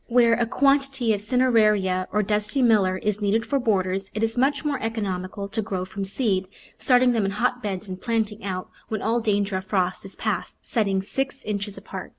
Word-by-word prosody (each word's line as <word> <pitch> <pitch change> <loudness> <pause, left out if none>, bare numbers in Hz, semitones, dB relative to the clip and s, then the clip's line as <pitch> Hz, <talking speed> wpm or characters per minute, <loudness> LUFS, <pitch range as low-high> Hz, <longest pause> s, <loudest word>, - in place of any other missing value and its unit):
Where 235 -1 +5
a 235 0 +1
quantity 275 -3 +2
of 200 - -2
Cineraria, 210 -6 +2
or 210 0 +2
Dusty 210 +6 0
Miller, 200 -6 +4
is 210 +2 -2
needed 215 +3 +1
for 280 - 0
borders, 195 -4 0
it 215 - -1
is 225 0 0
much 280 +4 +1
more 285 -3 -1
economical 200 -3 -3
to 220 +2 -1
grow 190 -4 -3
from 195 +1 -5
seed, 195 -2 0 0.3
starting 250 -1 +5
them 225 -3 +1
in 195 - +1
hotbeds 215 -3 -1
and 185 0 -7
plant 225 -2 0
ing 210 +1 -12
out 185 -2 -4 0.2
when 215 -2 -3
all 230 +2 +2
danger 205 -3 0
of 190 - -6
frost 185 -2 0
is 195 - -8
past, - - -3
setting 195 -5 0
six 270 +6 -3
inches 205 -1 -3
apart. - - -7
210 Hz, 195 wpm, -24 LUFS, 195-240 Hz, 0.3 s, Where